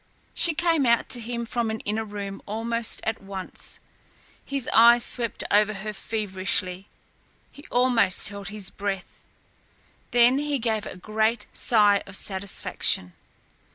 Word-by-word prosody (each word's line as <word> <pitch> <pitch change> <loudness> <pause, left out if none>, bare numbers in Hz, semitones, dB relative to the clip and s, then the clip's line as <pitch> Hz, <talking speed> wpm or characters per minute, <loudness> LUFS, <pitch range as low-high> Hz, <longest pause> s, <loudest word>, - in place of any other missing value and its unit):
She 335 -2 +1
came 330 -4 +2
out 235 0 +2
to 245 - +1
him 235 +1 -4
from 235 -1 -1
an 220 0 -3
inner 215 +2 -2
room 200 -2 -7
almost 230 +2 -1
at 225 0 -3
once. 195 -1 -7 0.6
His 275 -3 -3
eyes 235 +1 +6
swept 235 -4 +1
over 210 +1 +3
her 210 +2 -5
feverishly. 190 -3 -2 0.6
He 285 - -15
almost 245 -8 +2
held 200 -1 -8
his 205 -2 -3
breath. 200 -2 -5 0.9
Then 245 +2 +4
he 295 -1 -1
gave 225 -3 -2
a - - -8
great 220 +4 -1
sigh 205 -3 +3
of 200 - -7
satisfaction. 190 - +2
220 Hz, 135 wpm, -25 LUFS, 200-235 Hz, 0.9 s, eyes